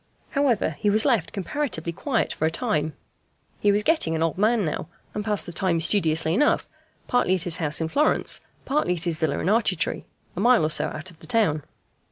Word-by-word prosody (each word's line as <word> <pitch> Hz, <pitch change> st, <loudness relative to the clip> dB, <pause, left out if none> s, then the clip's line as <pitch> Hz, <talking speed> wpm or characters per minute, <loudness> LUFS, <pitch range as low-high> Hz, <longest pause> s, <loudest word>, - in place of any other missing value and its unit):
However, 275 Hz, -, +1 dB
he 210 Hz, -, +1 dB
was 215 Hz, +2 st, +3 dB
left 235 Hz, -, +2 dB
comparatively 200 Hz, -, -3 dB
quiet 225 Hz, -, -1 dB
for 155 Hz, -, 0 dB
a -, -, +2 dB
time. 160 Hz, -5 st, -1 dB, 0.7 s
He 205 Hz, -, +3 dB
was 205 Hz, +1 st, +1 dB
getting 310 Hz, -, +2 dB
an 160 Hz, -, 0 dB
old 165 Hz, -, 0 dB
man 215 Hz, +1 st, +2 dB
now, 155 Hz, -, -3 dB, 0.3 s
and 210 Hz, -, -3 dB
passed 210 Hz, -1 st, -1 dB
the 175 Hz, -, -8 dB
time 180 Hz, -3 st, +1 dB
studiously 160 Hz, -2 st, +2 dB
enough, 295 Hz, +10 st, +2 dB, 0.4 s
partly 245 Hz, -7 st, +2 dB
at 180 Hz, -, -1 dB
his 175 Hz, -3 st, +3 dB
house 155 Hz, -2 st, -1 dB
in 160 Hz, -, -1 dB
Florence, 295 Hz, -, +1 dB, 0.2 s
partly 270 Hz, -11 st, +1 dB
at 165 Hz, -, -3 dB
his 170 Hz, -3 st, -1 dB
villa 155 Hz, -3 st, 0 dB
in -, -, -2 dB
Arcetri, 205 Hz, -4 st, +1 dB, 0.3 s
a -, -, -4 dB
mile 235 Hz, -4 st, +4 dB
or 155 Hz, -, 0 dB
so -, -, +2 dB
out 160 Hz, +4 st, -7 dB
of 160 Hz, -, -20 dB
the -, -, -12 dB
town. 210 Hz, -11 st, +1 dB
185 Hz, 210 wpm, -24 LUFS, 160-230 Hz, 0.7 s, mile